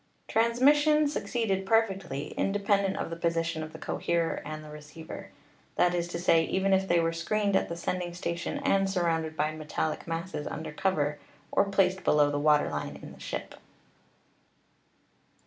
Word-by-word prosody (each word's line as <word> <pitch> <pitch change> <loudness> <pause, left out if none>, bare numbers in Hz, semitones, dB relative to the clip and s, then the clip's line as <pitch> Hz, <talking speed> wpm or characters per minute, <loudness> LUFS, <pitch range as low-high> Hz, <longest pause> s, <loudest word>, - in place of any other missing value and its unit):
Transmission 290 +7 +4
succeeded 215 -6 -1
perfectly, 190 -9 0
independent 200 -1 +1
of - - -3
the - - -3
position 165 -1 -1
of 155 0 -6
the - - -9
coherer 170 -1 -1
and 155 0 -6
the 150 - -10
receiver; 150 +1 -9 0.5
that 175 0 +3
is 175 -1 -1
to 175 - -4
say, 165 -2 +4
even 190 +3 +1
if 190 0 +2
they 175 -2 +3
were 165 0 +1
screened 200 +4 0
at - - +1
the 170 - -4
sending 175 0 -2
station 170 -1 -3
and 195 0 +2
surrounded 165 -4 0
by 155 +1 +1
metallic 155 +1 -3
masses 165 -2 -4
under 160 - -5
cover 150 -4 0 0.3
or 200 - +3
placed 190 -1 +1
below 145 -1 +4
the 145 - -1
water 150 0 +4
line 75 -1 -4
in - - -10
the - - -15
ship. - - -5
170 Hz, 165 wpm, -29 LUFS, 155-195 Hz, 0.5 s, Transmission